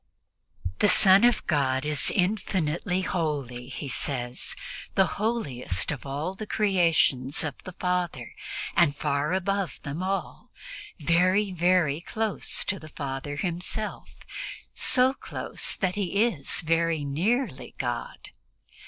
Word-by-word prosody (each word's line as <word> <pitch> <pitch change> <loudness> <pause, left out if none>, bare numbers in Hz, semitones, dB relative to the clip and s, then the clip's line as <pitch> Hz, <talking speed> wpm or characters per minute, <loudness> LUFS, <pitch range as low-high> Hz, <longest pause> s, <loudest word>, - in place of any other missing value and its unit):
The - - +5
Son 195 0 +7
of 240 0 +3
God 135 -3 +1
is 150 -1 +4
infinitely 180 -2 0
holy, 140 -9 -2
he 140 +2 -6
says, 125 -2 -1 0.4
the 190 - +5 0.2
holiest 140 - 0
of 140 -2 -6
all 145 +7 -3
the 210 +2 -7
creations 165 -11 +2
of 150 -3 -2
the 185 - -7
Father 175 -9 -2 0.4
and 155 -5 +4
far 145 +1 0
above 190 -4 -1
them 145 +4 -4
all. 195 +1 -3 0.5
Very, 185 +6 +3
very 175 -4 +2
close 220 +3 -1
to 195 - -2
the 155 - -11
Father 140 0 -5
Himself, 180 +6 -3 0.6
so 255 0 +4
close - - -3
that 185 -2 0
He 200 +2 +1
is 180 - 0
very 165 -2 +1
nearly 180 - -1
God. 120 -2 -4
170 Hz, 120 wpm, -27 LUFS, 140-190 Hz, 0.6 s, Son